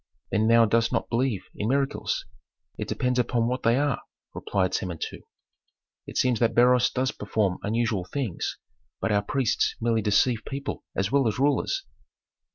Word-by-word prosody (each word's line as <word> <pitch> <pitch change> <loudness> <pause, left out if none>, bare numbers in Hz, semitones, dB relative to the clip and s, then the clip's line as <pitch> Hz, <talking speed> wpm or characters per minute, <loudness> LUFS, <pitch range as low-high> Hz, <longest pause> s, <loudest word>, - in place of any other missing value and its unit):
"Then 110 +1 +2
thou 115 0 +6
dost 115 +1 +2
not - - -1
believe 120 -4 0
in 105 - -2
miracles?" 135 +1 0 0.5
"It - - -5
depends 125 0 0
upon 120 -1 +1
what 125 +1 -1
they 115 +2 +3
are," 145 0 0 0.3
replied 95 -2 -1
Samentu. 85 -4 -3 0.9
"It - - -6
seems 125 -3 +2
that 115 - +2
Beroes 125 +1 +5
does 130 +1 0
perform 105 -3 -1
unusual 110 -3 0
things; 110 -1 -3 0.4
but 110 - -1
our 100 -1 +3
priests 125 +3 0
merely 115 -1 +1
deceive 110 +3 +2
people 140 +1 -5
as 95 +3 0
well 140 -3 +3
as 110 - -1
rulers." 145 - +1
115 Hz, 160 wpm, -26 LUFS, 105-130 Hz, 0.9 s, thou